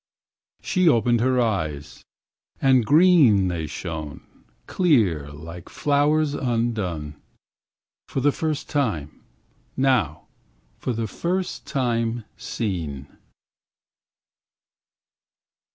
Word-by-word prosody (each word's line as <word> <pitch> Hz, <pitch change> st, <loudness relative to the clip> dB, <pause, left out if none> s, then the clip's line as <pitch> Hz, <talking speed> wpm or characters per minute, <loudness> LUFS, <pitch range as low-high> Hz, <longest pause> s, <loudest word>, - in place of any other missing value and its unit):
She 185 Hz, -3 st, +3 dB
opened 120 Hz, -2 st, +3 dB
her 130 Hz, +1 st, +2 dB
eyes, 80 Hz, -11 st, -2 dB, 0.6 s
and 130 Hz, -2 st, +4 dB
green 145 Hz, -, +5 dB
They 80 Hz, -3 st, -3 dB
shone, 80 Hz, -3 st, -6 dB, 0.4 s
clear 105 Hz, -, +2 dB
like 85 Hz, +4 st, -10 dB
flowers 145 Hz, +1 st, +1 dB
undone 110 Hz, -, -2 dB, 0.9 s
For -, -, -3 dB
the 145 Hz, +2 st, +3 dB
first 155 Hz, 0 st, -3 dB
time, 105 Hz, -, -2 dB, 0.6 s
now 125 Hz, -, +1 dB, 0.6 s
for -, -, -2 dB
the 115 Hz, 0 st, -2 dB
first 180 Hz, -, -3 dB
time 115 Hz, -4 st, -1 dB
seen. 80 Hz, -, -4 dB
115 Hz, 85 wpm, -23 LUFS, -, 0.9 s, green